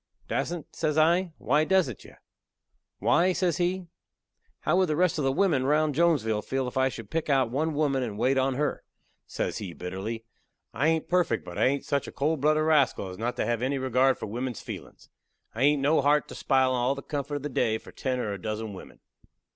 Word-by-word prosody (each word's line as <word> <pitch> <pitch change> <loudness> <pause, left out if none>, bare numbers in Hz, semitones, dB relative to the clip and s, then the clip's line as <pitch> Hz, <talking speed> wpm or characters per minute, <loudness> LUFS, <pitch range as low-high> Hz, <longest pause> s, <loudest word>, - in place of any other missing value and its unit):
"Dassent!" 170 -3 -3
says 150 0 -1
I. 170 +3 +3
"Why 150 +4 +2
dassent 165 - +1
you?" - - -15 0.8
"Why," 170 - +3
says 175 -3 0
he, 180 +1 -1 0.8
"how - - +2
would 185 -3 +3
the 155 - +1
rest 175 -1 +2
of - - 0
the 135 - +2
wimmin 150 -3 +2
round 150 +2 +2
Jonesville 140 -10 +2
feel 130 +3 -2
if 125 - -7
I 130 0 +3
should 115 -5 -9
pick 165 -1 -2
out 135 -4 +2
one 155 +4 -1
woman 140 -3 +1
and 110 -5 -4
wait 130 +5 +2
on 135 0 +1
her?" 150 +2 -1 0.4
Says - - -3
he 95 -5 -6
bitterly: 100 +6 -5 0.5
"I 135 +9 +1
hain't 160 -1 +1
perfect, 175 -10 +1
but 90 - -7
I - - +4
hain't 140 +1 -1
such 140 -1 -1
a - - -7
cold 150 +1 -1
blooded 155 +1 +3
rascal 145 -10 +2
as 90 - -9
not 120 +2 -2
to - - -1
have 120 0 -1
any 135 +2 0
regard 130 0 +2
for - - -5
wimmen's 120 +3 -4
feelin's. - - -9 0.5
I 115 - -5
hain't 145 0 +3
no 150 +2 +4
heart 145 +1 +3
to - - -8
spile 130 -1 +2
all 125 +2 +1
the 140 - -8
comfort 145 -1 -4
of 145 - -4
the 150 - -3
day 110 -4 +1
for - - -14
ten 130 -1 -2
or 110 -5 -2
a 100 - -7
dozen 110 +1 -4
wimmen." 95 - -12
135 Hz, 220 wpm, -27 LUFS, 120-155 Hz, 0.8 s, I